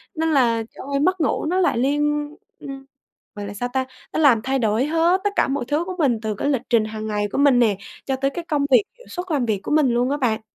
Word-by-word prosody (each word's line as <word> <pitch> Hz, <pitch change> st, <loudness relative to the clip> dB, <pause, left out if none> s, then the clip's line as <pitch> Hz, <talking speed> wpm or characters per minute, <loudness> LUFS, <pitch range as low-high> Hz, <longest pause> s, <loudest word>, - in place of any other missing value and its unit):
Nên 320 Hz, 0 st, 0 dB
là, 235 Hz, -6 st, +2 dB
trời -, -, -9 dB
ơi, 275 Hz, -, +1 dB
mất 365 Hz, +4 st, +1 dB
ngủ 295 Hz, -, 0 dB
nó 360 Hz, +4 st, 0 dB
lại 360 Hz, -9 st, +2 dB
liên 295 Hz, +3 st, 0 dB, 0.2 s
ừm, 270 Hz, -1 st, -8 dB, 0.5 s
gọi 205 Hz, -1 st, -6 dB
là 200 Hz, -, -7 dB
sao 245 Hz, +4 st, -3 dB
ta? 260 Hz, 0 st, 0 dB, 0.3 s
Nó -, -, -2 dB
làm 255 Hz, -8 st, +5 dB
thay 270 Hz, +2 st, 0 dB
đổi 220 Hz, 0 st, +1 dB
hết 330 Hz, +4 st, +2 dB
tất 410 Hz, -, +2 dB
cả -, -, +2 dB
mọi 270 Hz, -1 st, -1 dB
thứ 300 Hz, +4 st, 0 dB
của 370 Hz, +1 st, -5 dB
mình 265 Hz, -8 st, +2 dB
từ 215 Hz, -1 st, -2 dB
cái 245 Hz, -, -2 dB
lịch 270 Hz, -5 st, 0 dB
trình 230 Hz, -3 st, +4 dB
hàng 215 Hz, 0 st, -6 dB
ngày 210 Hz, -1 st, -1 dB
của -, -, -2 dB
mình 280 Hz, -3 st, +5 dB
nè, 220 Hz, -5 st, +3 dB, 0.3 s
cho 270 Hz, -, 0 dB
tới 275 Hz, +1 st, 0 dB
cái 340 Hz, +4 st, -6 dB
công 290 Hz, -2 st, +1 dB
việc 265 Hz, -, +6 dB, 0.2 s
hiệu -, -, -17 dB
suất 355 Hz, 0 st, -6 dB
làm 280 Hz, -6 st, +1 dB
việc 210 Hz, -4 st, -1 dB
của -, -, -6 dB
mình 300 Hz, -3 st, +4 dB
luôn 245 Hz, +2 st, +1 dB
á, 285 Hz, -, +1 dB
bạn. 240 Hz, -6 st, 0 dB
270 Hz, 275 wpm, -22 LUFS, 230-300 Hz, 0.5 s, việc